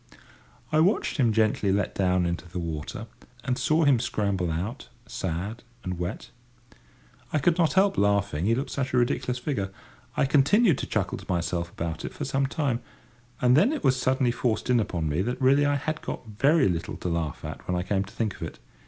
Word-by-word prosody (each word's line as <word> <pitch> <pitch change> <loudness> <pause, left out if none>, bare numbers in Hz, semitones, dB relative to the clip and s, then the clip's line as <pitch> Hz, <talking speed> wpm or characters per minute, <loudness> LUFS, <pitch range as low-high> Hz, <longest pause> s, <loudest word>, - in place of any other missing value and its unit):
I 155 - +3
watched 180 +3 +2
him 120 -5 +3
gently 110 -2 +2
let 100 0 0
down 90 -2 +2
into 85 +1 -3
the 90 - -6
water, 80 -3 -4 0.4
and 125 - 0
saw 155 +5 +2
him 140 -5 +5
scramble 100 -6 -1
out, 95 - -4 0.2
sad 95 +7 -4 0.2
and 90 -1 -4
wet. 90 +4 -5 1.0
I - - +1
could 165 +4 +2
not 165 -2 +3
help 195 +1 +3
laughing, 100 -5 +1
he 115 +2 +3
looked 135 +3 -3
such 130 -2 -2
a - - +3
ridiculous 125 +1 +1
figure. 125 -7 -2 0.5
I - - +4
continued 145 - +4
to - - -3
chuckle - - -1
to - - -12
myself 85 -1 -1
about 80 -1 -4
it - - -5
for - - -4
some 135 0 0
time, 140 -5 -1 0.6
and 125 0 +6
then 200 - +5
it 310 - -3
was 130 - +4
suddenly 130 -1 +1
forced 120 +1 -1
in 120 - +4
upon 85 -7 -1
me 75 +4 0
that 125 +5 -2
really 140 +2 +4
I 145 - +2
had 155 +3 -3
got - - -5
very 135 +7 +3
little 85 -1 -2
to - - -5
laugh 85 -3 -2
at - - -7
when 90 - 0
I 90 - -1
came 100 -1 +1
to 95 - -13
think 110 -4 -2
of - - -16
it. - - -5
115 Hz, 205 wpm, -26 LUFS, 90-135 Hz, 1.0 s, and